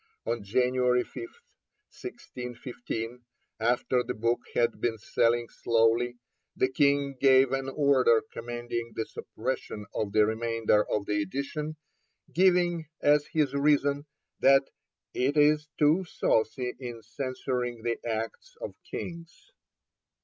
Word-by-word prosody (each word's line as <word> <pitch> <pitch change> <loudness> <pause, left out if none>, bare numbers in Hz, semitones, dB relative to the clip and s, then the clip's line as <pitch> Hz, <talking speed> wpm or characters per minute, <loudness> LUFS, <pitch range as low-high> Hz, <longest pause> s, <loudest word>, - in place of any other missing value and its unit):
On 115 -2 -2
January 125 +3 +2
5, - - -22
1615, 125 - -8 0.4
after 120 +2 +2
the - - -4
book 115 +3 +1 0.2
had 120 - +1
been 115 -2 0
selling 115 +2 +1
slowly, 115 +2 +2 0.4
the 130 - +2
King 140 0 +2
gave 130 -1 +6
an 135 0 -1
order 135 -5 +4
commanding 120 0 -4
the 110 - -1
suppression 110 -3 -5
of 105 -2 -2
the 105 0 +5
remainder 110 -1 +1
of 105 -1 0
the 105 0 0
edition, 140 - -4 0.6
giving 175 -2 +3
as 145 0 +3
his 155 -4 +1
reason 145 0 +2 0.3
that 135 0 +6 0.5
'it 135 +4 0
is 150 0 +4
too 155 +5 +4
saucy 125 -6 0
in 120 -3 -7
censuring 125 -1 -3
the 115 -1 -1
acts 115 - -4
of - - -6 0.2
kings.' 170 - -8
125 Hz, 120 wpm, -28 LUFS, 115-145 Hz, 0.6 s, gave